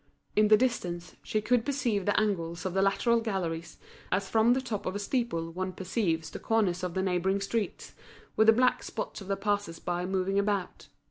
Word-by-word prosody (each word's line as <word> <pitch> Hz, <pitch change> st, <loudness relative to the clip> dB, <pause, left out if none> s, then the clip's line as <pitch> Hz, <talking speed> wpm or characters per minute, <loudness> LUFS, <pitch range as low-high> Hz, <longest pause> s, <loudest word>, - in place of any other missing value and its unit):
In 215 Hz, 0 st, +5 dB
the 215 Hz, 0 st, +7 dB
distance, 180 Hz, -8 st, -2 dB
she 215 Hz, -, -1 dB
could 245 Hz, 0 st, +2 dB
perceive 245 Hz, -9 st, -1 dB
the 205 Hz, -, +3 dB
angles 175 Hz, -5 st, -1 dB
of 185 Hz, -, -2 dB
the 190 Hz, -, +2 dB
lateral 230 Hz, +4 st, +3 dB
galleries, 170 Hz, -7 st, -3 dB, 0.3 s
as 195 Hz, +1 st, +1 dB
from 225 Hz, +4 st, +4 dB
the 260 Hz, -, +1 dB
top 230 Hz, -6 st, -4 dB
of 185 Hz, -, -2 dB
a -, -, 0 dB
steeple 205 Hz, -6 st, -1 dB
one 185 Hz, +2 st, -3 dB
perceives 180 Hz, -5 st, -1 dB
the -, -, -6 dB
corners 200 Hz, -5 st, +1 dB
of 180 Hz, -2 st, -3 dB
the 190 Hz, -, +1 dB
neighbouring 190 Hz, +1 st, +1 dB
streets, 205 Hz, +2 st, -3 dB, 0.4 s
with 220 Hz, -, +4 dB
the -, -, +10 dB
black 250 Hz, +2 st, +3 dB
spots -, -, -5 dB
of 195 Hz, -, -9 dB
the 195 Hz, 0 st, -1 dB
passers 205 Hz, -4 st, -1 dB
by 175 Hz, +1 st, -2 dB
moving 190 Hz, +1 st, 0 dB
about. 200 Hz, -2 st, -2 dB
195 Hz, 200 wpm, -29 LUFS, 180-220 Hz, 0.4 s, the